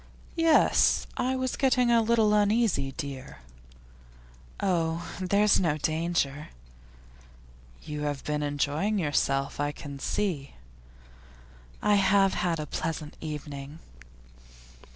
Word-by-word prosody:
'Yes; 330 -1 +4
I 260 +1 0
was 260 -1 -2
getting 250 -3 +2
a 230 -1 +5
little 220 -2 +3
uneasy, 210 - +2
dear.' 135 - -7 1.2
'Oh, 170 -3 0
there's 200 +2 +3
no 160 -5 +1
danger.' 155 -2 -1 1.3
'You 150 0 -5
have 145 -2 -3
been 150 0 -2
enjoying 145 +8 -1
yourself, 140 -5 0
I 145 0 0
can 145 -2 -9
see.' 170 -6 -2 1.3
'I 210 0 +4
have 195 0 +4
had 170 -3 -1
a 150 - -3
pleasant 155 0 -4
evening. 145 -1 -7
165 Hz, 105 wpm, -27 LUFS, 145-210 Hz, 1.3 s, a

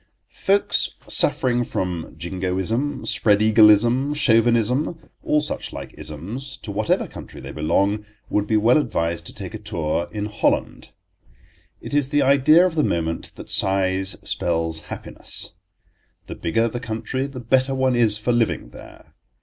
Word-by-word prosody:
FOLKS 200 +1 +1
suffering 120 -1 +2
from 90 -7 -4
Jingoism, 95 - -2
Spreadeagleism, 110 +5 +4
Chauvinism—all 125 +5 +1
such 150 - -4
like - - -8
isms, 95 - -6
to 105 - -8
whatever 105 +2 0
country - - -10
they - - -8
belong—would 100 +6 -1
be 110 - +2
well 115 +7 +4
advised 85 - -2
to - - -7
take - - -7
a - - -6
tour 80 +2 -2
in 105 -1 -3
Holland. 105 0 -1 0.9
It - - -7
is 145 -2 +1
the 145 -1 +2
idea 140 +6 +5
of 185 - 0
the 155 -2 +1
moment 80 -1 -2
that - - -10
size 95 0 +1
spells 80 -2 -1
happiness. - - -7 0.7
The - - -7
bigger 115 +8 0
the 120 +1 -4
country 115 +3 -3
the 135 -2 -8
better 130 +3 +1
one 130 -1 +2
is 110 -3 +3
for 110 +3 -1
living 115 - 0
there. - - -14
110 Hz, 140 wpm, -22 LUFS, 95-130 Hz, 0.9 s, idea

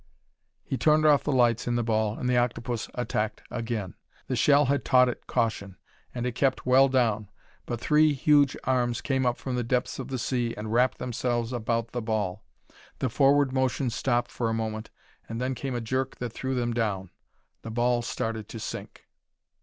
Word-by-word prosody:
He 135 - -3
turned 155 0 +4
off 150 -2 +5
the 150 - -1
lights 120 -4 +2
in 120 - +1
the 120 - +1
ball 110 -1 0
and 125 - -3
the 125 - +2
octopus 120 -1 -1
attacked 110 -3 -2
again. 115 -5 -3 0.3
The 130 - -2
shell 145 +3 +4
had 140 +2 +1
taught 125 -1 +5
it 120 - -7
caution 110 -6 -1 0.4
and 120 0 -2
it 125 - -1
kept 130 +3 0
well 130 +2 +6
down, 110 -6 +1 0.4
but 120 - -3
three 150 +4 +4
huge 145 0 +3
arms 120 -2 +1
came 130 -2 0
up 120 - 0
from 130 -2 -4
the 125 - 0
depths 125 +3 -1
of 130 - -5
the 135 -1 -3
sea 120 -1 -1
and 105 +1 -4
wrapped 125 +2 +3
themselves 120 0 -2
about 115 0 -1
the 120 - -3
ball. 105 -3 -2 0.5
The 130 - -1
forward 140 +2 +3
motion 130 -1 0
stopped 120 0 0
for 115 -2 -1
a 115 - 0
moment, 110 0 -3 0.4
and 115 0 -4
then 130 +1 -1
came 130 0 -4
a 120 - -2
jerk 130 +3 -2
that 120 -2 -5
threw 130 +1 -3
them 120 -1 -1
down. 100 -6 -2 0.5
The 115 - -7
ball 120 +1 +1
started 110 -2 -4
to 115 - -7
sink. - - -7
120 Hz, 195 wpm, -27 LUFS, 115-130 Hz, 0.5 s, well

